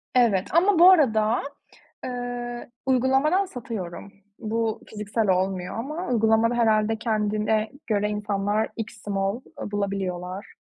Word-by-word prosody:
Evet 220 -7 +3
ama 365 +1 +4
bu 355 +2 +10
arada, 225 -9 +3 0.6
eee, 245 -1 -5 0.2
uygulamadan 270 +8 +3
satıyorum. 210 - -7 0.3
Bu 225 -1 -2
fiziksel 210 +1 -2
olmuyor 185 0 0
ama 305 +9 -4
uygulamada 225 0 +3
herhâlde 220 -1 +2
kendine 215 -1 0 0.2
göre 210 -1 +1
insanlar 210 +1 -1
extra 225 -1 -6
small, 195 +4 -1 0.2
eee, - - -5
bulabiliyorlar. 195 -2 -3
220 Hz, 110 wpm, -25 LUFS, 205-245 Hz, 0.6 s, bu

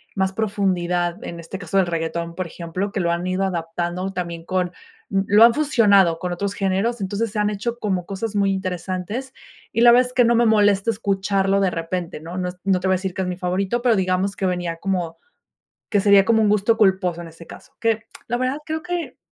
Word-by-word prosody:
más 190 -1 +1
profundidad, 180 -4 -1
en 170 - -6
este 170 +3 -7
caso 180 +1 -6
del 190 - +4
reguetón, 170 0 -3
por 185 0 -3
ejemplo, 175 +4 -4
que - - -1
lo 170 - +1
han 170 +1 -2
ido 185 +1 0
adaptando, 175 +1 -3
también 170 -2 -5
con 185 -1 -1 0.4
lo 200 +2 +4
han 230 0 +7
fusionado 205 - +4
con 180 +1 -3
otros 200 +3 -3
géneros, 200 +4 -1
entonces 200 +3 -2
se 210 - -3
han 210 0 +2
hecho 220 +3 -3
como 190 -4 -1
cosas 200 +3 -4
muy 195 -1 +2
interesantes 190 +6 -4 0.4
y 230 - +1
la 240 - +8
verdad 250 +1 +5
es - - -15
que 250 -1 +4
no 235 - +4
me 235 +1 +4
molesta 205 -1 +3
escucharlo 195 -2 0
de 190 -2 +2
repente, 165 0 -4
¿no? 170 +3 -7
No 180 -1 -1
no 190 -2 +2
te 190 - -2
voy 190 - +3
a - - 0
decir 190 -1 -4
que 190 - -2
es - - -3
mi 180 - -2
favorito, 190 +5 -1
pero, 240 -2 +3
digamos 185 +1 0
que 190 - -1
venía 175 -2 -2
como, 175 -2 -2 0.7
que 205 - +3
sería 200 -1 +6
como 225 0 +3
un 210 - +3
gusto 210 +2 +3
culposo 190 -5 +2
en 165 - -9
ese 165 +1 -14
caso, - - -13
que 225 -1 0 0.2
la 240 - 0
verdad 255 +3 -1
creo 315 +1 -3
que, 355 -1 -4
195 Hz, 220 wpm, -22 LUFS, 180-210 Hz, 0.7 s, la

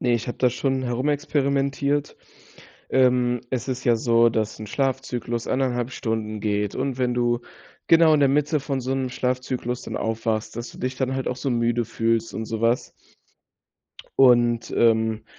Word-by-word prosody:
Ne, 120 - +1
ich 120 +1 -2
habe - - -4
das 125 -2 +3
schon 130 +1 -1
herumexperimentiert. 140 +2 0 0.7
Ähm, 125 -2 +3
es 130 0 -3
ist 130 -1 -3
ja 120 -2 +4
so, 115 0 +4
dass 110 -2 -2
'n 110 - -6
Schlafzyklus 125 -2 -2
1,5 125 -2 -1
Stunden 110 -3 -3
geht 105 -1 -1
und 130 -1 -2
wenn 125 -1 +1
du 120 0 +1 0.5
genau 165 -1 +6
in 150 - +3
der 140 - +5
Mitte 150 +1 +1
von 135 -1 -3
so 130 +2 -1
'nem 130 -1 -1
Schlafzyklus 125 -1 -2
dann - - -6
aufwachst, 110 -1 -2
dass 120 0 -5
du - - -14
dich 130 0 -3
dann 130 0 -1
halt 135 -1 -3
auch 125 - -2
so 135 +1 -3
müde 120 0 +1
fühlst 115 -1 -1
und 110 - -3
sowas. 115 +2 0 1.3
Und, 120 -3 +4
ähm, 110 -1 +2
125 Hz, 170 wpm, -24 LUFS, 115-130 Hz, 1.3 s, genau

